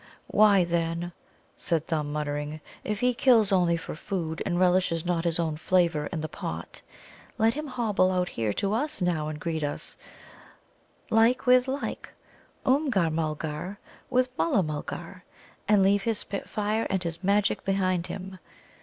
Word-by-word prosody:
"Why, 205 Hz, -3 st, +6 dB
then," 170 Hz, 0 st, -1 dB, 0.5 s
said 165 Hz, -2 st, -1 dB
Thumb, 150 Hz, -3 st, -2 dB
muttering, 150 Hz, 0 st, -3 dB, 0.2 s
"if 210 Hz, -1 st, -3 dB
he 250 Hz, 0 st, +3 dB
kills 230 Hz, -4 st, +4 dB
only 175 Hz, -3 st, +3 dB
for 165 Hz, -, -7 dB
food, 165 Hz, -1 st, -4 dB
and 175 Hz, -2 st, 0 dB
relishes 180 Hz, -2 st, +2 dB
not 175 Hz, -1 st, 0 dB
his 165 Hz, -1 st, +1 dB
own 160 Hz, -3 st, -1 dB
flavour 165 Hz, -3 st, +2 dB
in 165 Hz, -4 st, -4 dB
the 155 Hz, -, -3 dB
pot, 85 Hz, -, -6 dB, 0.6 s
let 225 Hz, +1 st, +3 dB
him 300 Hz, +1 st, -4 dB
hobble 220 Hz, -8 st, +1 dB
out 180 Hz, -1 st, 0 dB
here 110 Hz, -2 st, -1 dB
to 200 Hz, -, -1 dB
us 295 Hz, +7 st, -1 dB
now 170 Hz, -4 st, 0 dB
and 155 Hz, -1 st, -5 dB
greet 160 Hz, 0 st, -2 dB
us, 145 Hz, -, -3 dB, 1.1 s
like 225 Hz, +3 st, +4 dB
with 250 Hz, 0 st, +5 dB
like 270 Hz, +2 st, -4 dB, 0.5 s
Oomgar 260 Hz, -, +2 dB
mulgar 155 Hz, +3 st, -3 dB, 0.3 s
with 255 Hz, 0 st, +1 dB
Mulla 265 Hz, -, +3 dB
mulgar 170 Hz, +4 st, -6 dB, 0.4 s
and 205 Hz, -1 st, +5 dB
leave 200 Hz, +1 st, +4 dB
his 225 Hz, +1 st, 0 dB
spit 200 Hz, +1 st, -5 dB
fire 215 Hz, +1 st, -1 dB
and 190 Hz, -1 st, 0 dB
his 170 Hz, +1 st, -4 dB
magic 200 Hz, +1 st, +2 dB
behind 185 Hz, -3 st, 0 dB
him. 190 Hz, -1 st, -7 dB
185 Hz, 155 wpm, -27 LUFS, 160-210 Hz, 1.1 s, Why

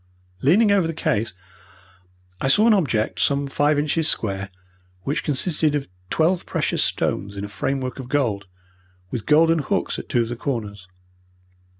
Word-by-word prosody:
Leaning 200 Hz, -, +4 dB
over 195 Hz, -5 st, +3 dB
the 165 Hz, -, -4 dB
case 110 Hz, -9 st, -1 dB, 1.1 s
I -, -, +1 dB
saw 210 Hz, +11 st, +4 dB
an 230 Hz, -, +6 dB
object, 120 Hz, -, 0 dB
some 140 Hz, 0 st, +2 dB
five 145 Hz, +2 st, +1 dB
inches 150 Hz, +2 st, +1 dB
square, 100 Hz, -2 st, -2 dB, 0.5 s
which 155 Hz, +8 st, -1 dB
consisted 150 Hz, +1 st, +1 dB
of 140 Hz, -2 st, -2 dB, 0.2 s
twelve 170 Hz, +3 st, +1 dB
precious -, -, 0 dB
stones 100 Hz, +1 st, -1 dB
in 100 Hz, -, -3 dB
a -, -, -6 dB
framework 130 Hz, +5 st, -3 dB
of 125 Hz, -2 st, -7 dB
gold, 110 Hz, -9 st, 0 dB, 0.6 s
with 120 Hz, -5 st, -4 dB
golden 165 Hz, +2 st, +5 dB
hooks 140 Hz, -, -1 dB
at -, -, -10 dB
two 120 Hz, -, +2 dB
of 115 Hz, -, -2 dB
the 120 Hz, -, -3 dB
corners. 105 Hz, -7 st, -4 dB
140 Hz, 160 wpm, -22 LUFS, 115-160 Hz, 1.1 s, an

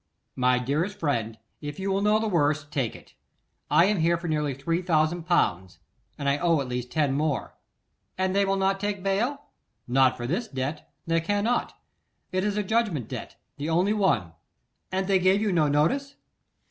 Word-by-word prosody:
'My 125 Hz, 0 st, +3 dB
dearest 150 Hz, +11 st, -1 dB
friend, 115 Hz, -8 st, -1 dB, 0.2 s
if 145 Hz, -1 st, -6 dB
you 195 Hz, +1 st, -1 dB
will 195 Hz, +1 st, +1 dB
know 210 Hz, +1 st, +4 dB
the 220 Hz, 0 st, -1 dB
worst, 150 Hz, -5 st, +1 dB
take 130 Hz, -7 st, -1 dB
it. -, -, -15 dB, 0.6 s
I 170 Hz, -, +5 dB
am 205 Hz, -1 st, +1 dB
here 170 Hz, +1 st, +3 dB
for 170 Hz, +1 st, -6 dB
nearly 150 Hz, -3 st, 0 dB
three 165 Hz, +6 st, -1 dB
thousand 165 Hz, -1 st, +1 dB
pounds, 95 Hz, -, +1 dB, 0.4 s
and 140 Hz, -, -3 dB
I 140 Hz, +1 st, +2 dB
owe 170 Hz, -3 st, +3 dB
at 135 Hz, -, -3 dB
least 125 Hz, 0 st, -4 dB
ten 145 Hz, -4 st, +1 dB
more.' 145 Hz, -1 st, -1 dB, 0.6 s
'And 185 Hz, 0 st, 0 dB
they 200 Hz, -, +4 dB
will 195 Hz, 0 st, +1 dB
not 195 Hz, 0 st, +1 dB
take 205 Hz, -1 st, -3 dB
bail?' 235 Hz, +9 st, 0 dB, 0.4 s
'Not 130 Hz, +1 st, +3 dB
for 120 Hz, -, -4 dB
this 185 Hz, -, -1 dB
debt; 135 Hz, +1 st, -4 dB
they 165 Hz, 0 st, +1 dB
cannot. 205 Hz, +7 st, 0 dB, 0.5 s
It 185 Hz, 0 st, 0 dB
is 210 Hz, 0 st, -1 dB
a 210 Hz, -, +1 dB
judgment 200 Hz, -, 0 dB
debt, -, -, -6 dB, 0.2 s
the 145 Hz, +3 st, -3 dB
only 180 Hz, +6 st, +2 dB
one.' 185 Hz, -, +1 dB, 0.6 s
'And 190 Hz, 0 st, 0 dB
they 195 Hz, -1 st, +3 dB
gave 185 Hz, +2 st, +4 dB
you 210 Hz, -1 st, 0 dB
no 160 Hz, -4 st, +3 dB
notice? 220 Hz, -, +1 dB
170 Hz, 185 wpm, -26 LUFS, 145-195 Hz, 0.6 s, I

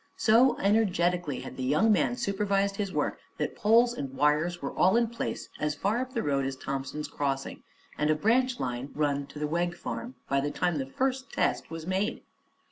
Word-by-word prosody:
So 235 Hz, +4 st, +5 dB
energetically 180 Hz, -, +1 dB
had -, -, -9 dB
the 130 Hz, -, -3 dB
young 150 Hz, +12 st, +3 dB
man 240 Hz, +3 st, +2 dB
supervised 200 Hz, -3 st, 0 dB
his 200 Hz, -2 st, -2 dB
work -, -, -1 dB, 0.2 s
that -, -, -2 dB
poles 235 Hz, +3 st, +4 dB
and 140 Hz, -, -5 dB
wires 150 Hz, +5 st, +2 dB
were -, -, -4 dB
all 190 Hz, +5 st, +4 dB
in 235 Hz, -1 st, +2 dB
place 235 Hz, -, -4 dB
as 150 Hz, -1 st, 0 dB
far 200 Hz, +9 st, 0 dB
up 255 Hz, 0 st, -4 dB
the 230 Hz, -, 0 dB
road 140 Hz, -1 st, +1 dB
as 135 Hz, 0 st, -2 dB
Thompson's 135 Hz, +3 st, -4 dB
Crossing 135 Hz, -1 st, -3 dB, 0.4 s
and 150 Hz, -, +2 dB
a 155 Hz, -, +4 dB
branch 245 Hz, +8 st, +2 dB
line 125 Hz, +2 st, -3 dB
run 145 Hz, -2 st, 0 dB
to -, -, -12 dB
the 150 Hz, -, -1 dB
Wegg 175 Hz, +3 st, -1 dB
Farm, 240 Hz, +7 st, -6 dB
by 140 Hz, 0 st, +1 dB
the 145 Hz, -, -1 dB
time 175 Hz, 0 st, 0 dB
the 135 Hz, -, -3 dB
first 260 Hz, -, -2 dB
test -, -, 0 dB
was 165 Hz, 0 st, -6 dB
made. 190 Hz, +3 st, -1 dB
175 Hz, 200 wpm, -28 LUFS, 145-220 Hz, 0.4 s, So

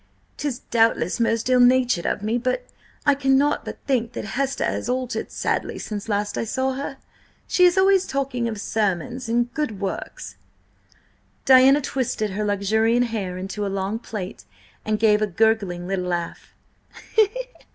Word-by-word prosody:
'Tis 285 Hz, -5 st, -2 dB
doubtless 225 Hz, -5 st, +2 dB
most 230 Hz, 0 st, +1 dB
ill 255 Hz, -1 st, +4 dB
natured 245 Hz, -6 st, +4 dB
of 205 Hz, -, -1 dB
me, 220 Hz, +2 st, 0 dB
but 255 Hz, -, -1 dB, 0.4 s
I 285 Hz, -, +6 dB
cannot 275 Hz, +1 st, +2 dB
but -, -, -7 dB
think 245 Hz, -4 st, 0 dB
that -, -, -5 dB
Hester 275 Hz, +1 st, -1 dB
has -, -, -2 dB
altered 255 Hz, 0 st, -2 dB
sadly -, -, -2 dB
since 210 Hz, 0 st, -6 dB
last 205 Hz, 0 st, -1 dB
I -, -, 0 dB
saw 260 Hz, +4 st, -1 dB
her. 275 Hz, +1 st, -5 dB, 0.5 s
She 360 Hz, -, +4 dB
is 355 Hz, +1 st, +4 dB
always 385 Hz, 0 st, +4 dB
talking 265 Hz, -3 st, -2 dB
of 220 Hz, -3 st, -4 dB
sermons 225 Hz, +5 st, -2 dB
and 240 Hz, +1 st, 0 dB
good 295 Hz, -10 st, -3 dB
works!" 195 Hz, -1 st, -5 dB, 1.1 s
Diana 265 Hz, +2 st, +7 dB
twisted 245 Hz, -6 st, -2 dB
her 210 Hz, +3 st, -2 dB
luxuriant 220 Hz, +4 st, +2 dB
hair 195 Hz, -5 st, -3 dB
into 195 Hz, +3 st, -4 dB
a -, -, -1 dB
long 195 Hz, +3 st, -2 dB
plait, 200 Hz, -5 st, -7 dB, 0.4 s
and 215 Hz, 0 st, 0 dB
gave 210 Hz, -1 st, +3 dB
a 215 Hz, -, +2 dB
gurgling 200 Hz, -3 st, +1 dB
little 190 Hz, -1 st, -2 dB
laugh. 175 Hz, -1 st, -4 dB
230 Hz, 155 wpm, -23 LUFS, 205-260 Hz, 1.1 s, Diana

